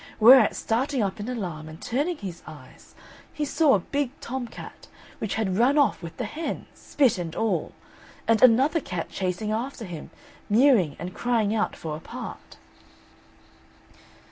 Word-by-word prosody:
Whereat 235 +1 +8
starting 255 +2 0
up 195 +1 -3
in 210 +4 -4
alarm 175 -10 -5
and 155 +1 -11
turning 295 +8 -1
his 185 - -7
eyes, 135 -4 -14 0.4
he 300 - -2
saw 295 -2 +4
a - - +2
big 280 +8 -2
tom 255 0 -4
cat, - - -11 0.3
which 210 - -2
had 200 -2 -1
run 265 +5 +4
off 285 - +3
with 165 -2 -9
the 245 - -2
hen, 310 +10 -4
spit 265 -10 +1
and 165 -2 -5
all; 225 -1 -1 0.5
and 225 -1 +3
another 260 +7 +5
cat 180 - -5
chasing 190 +3 -2
after 230 +2 -3
him, 170 -5 -8 0.4
mewing, 215 - +4
and 175 +3 -6
crying 230 -4 0
out 220 -1 0
for 155 -2 -5
a - - -7
part. - - -9
220 Hz, 160 wpm, -25 LUFS, 180-265 Hz, 0.5 s, Whereat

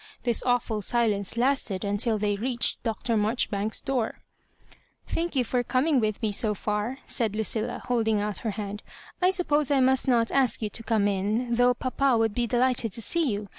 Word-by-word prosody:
This 240 -2 +1
awful 245 -3 0
silence 215 -2 0
lasted 240 -7 0
until 210 +3 +1
they 205 0 0
reached 240 +3 0
Dr. 230 0 -2
Marjoribauks's 215 -1 -1
door. 260 -5 -1 0.6
^ - - -24 0.3
Thank 340 -1 -2
you 260 - +3
for 245 +1 0
coming 260 +4 +1
with 215 -1 -2
me 215 - +1
so 210 +1 +1
for," 210 +5 -2
said 220 -4 -1
Lucilla, 220 +2 -1
holding 225 -3 +1
out 210 0 -3
her 225 - -3
hand. 205 0 -5 0.2
" - - -22
I 365 - +5
s'upposcf 300 -6 +1
I - - +3
must 260 +1 +2
not 235 -3 +2
ask 265 -3 +2
you 215 - -2
to 230 - -2
come 220 -2 +1
in, 210 +5 -1
though 245 +1 +4
papa 255 0 +1
would 225 -2 +1
be 240 +1 0
delighted 245 -2 +1
to 230 - -4
see 335 +1 +1
you. 205 0 -3
230 Hz, 195 wpm, -26 LUFS, 210-255 Hz, 0.6 s, I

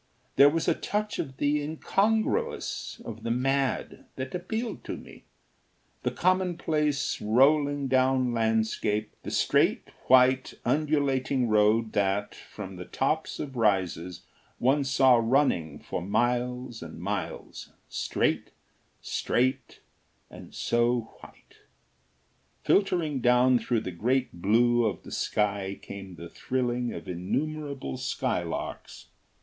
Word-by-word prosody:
There 140 +1 +8
was 165 +2 -1
a - - +4
touch 210 0 -3
of 135 0 -4
the 145 +1 +1
incongruous, 195 +8 -1
of 110 -1 -7
the 115 - -4
mad, 135 +3 -1
that 130 0 -5
appealed 220 +6 -4
to - - -4
me - - -14 0.8
the - - 0
commonplace 165 -6 0
rolling 140 +5 +3
down 130 -1 +2
landscape, 110 -2 0
the - - -6
straight, - - +2 0.2
white, 130 0 +4
undulating 140 -4 +1
road 110 +1 +3
that, 100 0 0
from 95 -3 -9
the 90 - -7
tops 155 - -1
of 135 -3 -5
rises, 95 -6 0 0.3
one 135 +4 +2
saw 130 -2 +5
running 115 - +1
for - - -5
miles 120 +4 -1
and - - -9
miles, - - -5 0.2
straight, - - -1 0.5
straight, 130 +2 -1 0.5
and - - -12
so 120 -1 0
white. - - -17 1.1
Filtering 170 -8 +2
down 125 +1 +4
through 115 0 0
the 90 - -5
great 125 +9 0
blue 120 +6 +3
of 110 -3 -2
the - - -11
sky 100 -2 -1
came 95 -2 -9
the 85 0 -9
thrilling 125 +3 -2
of 85 - -8
innumerable 140 - -3
skylarks. - - -3
125 Hz, 115 wpm, -27 LUFS, 110-140 Hz, 1.1 s, There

